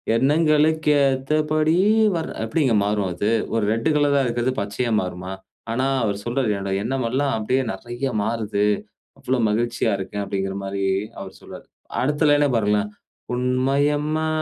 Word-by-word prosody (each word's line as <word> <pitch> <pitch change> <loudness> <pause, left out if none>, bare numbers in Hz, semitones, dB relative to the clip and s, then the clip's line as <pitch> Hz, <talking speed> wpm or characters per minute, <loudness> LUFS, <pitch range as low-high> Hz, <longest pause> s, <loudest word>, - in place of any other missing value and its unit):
எண்ணங்களுக்கு 155 +3 +3 0.2
ஏத்தபடி 155 +4 +1 0.4
வர் 160 - -3
எப்பிடிங்க 125 0 +1
மாறும் 105 -2 0
அது. 100 +5 -1 0.2
ஒரு 115 -2 +1
ரெட்டு 115 +7 0
கலரா 145 -1 +3
இருக்குறது, 120 +2 0
பச்சையா 105 +4 -2
மாறுமா? 90 +1 -5 0.4
ஆனா, 130 +3 0 0.2
அவரு 100 -2 0
சொல்றாரு 120 -2 0
என்னோட 100 0 -4
எண்ணம் 130 +1 -1
எல்லாம் 135 +1 0
அப்பிடியே 130 +5 0
நெறய 120 +7 -4
மாறுது. 110 -2 -1 0.5
அவ்ளோ 130 +1 -1
மகிழ்ச்சியா 120 +3 0
இருக்கேன். 100 +2 -4
அப்பிடிங்கிற 95 -1 -3
மாரி 100 0 -2 0.3
அவர் 95 -1 -9
சொல்றாரு. - - -11 0.4
அடுத்த 150 +3 +1
லைன்னா 145 0 +4
பாருங்களேன், 105 -1 +1 0.4
உண்மையம்மா 145 +5 +1
125 Hz, 135 wpm, -22 LUFS, 105-145 Hz, 0.5 s, லைன்னா